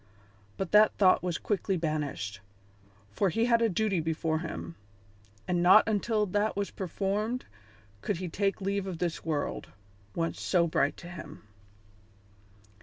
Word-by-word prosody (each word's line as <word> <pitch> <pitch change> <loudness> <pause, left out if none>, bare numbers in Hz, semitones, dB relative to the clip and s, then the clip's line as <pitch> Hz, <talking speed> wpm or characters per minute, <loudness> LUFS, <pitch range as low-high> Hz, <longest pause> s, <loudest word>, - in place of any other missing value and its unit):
But 190 - -3
that 210 0 +5
thought 185 -2 +5
was 175 -2 -2
quickly 195 -2 -1
banished, 145 - -3 0.7
for 195 - +1
he 225 +7 +1
had 235 -1 +3
a 230 - +3
duty 200 -1 0
before 160 0 -1
him, 85 - -6 0.7
and 175 -1 +1
not 185 +6 +7
until 215 0 +1
that 205 +3 0
was 200 -1 -2
performed 205 +6 -2 0.6
could 200 - -1
he 185 +1 -4
take 195 +4 -1
leave 195 0 -1
of 180 -3 -4
this 170 -1 -2
world, 155 -3 -2 0.5
once 165 0 -2
so 175 -2 +2
bright 145 -3 +1
to 175 - -10
him. 175 -8 -10
185 Hz, 145 wpm, -29 LUFS, 165-205 Hz, 0.7 s, not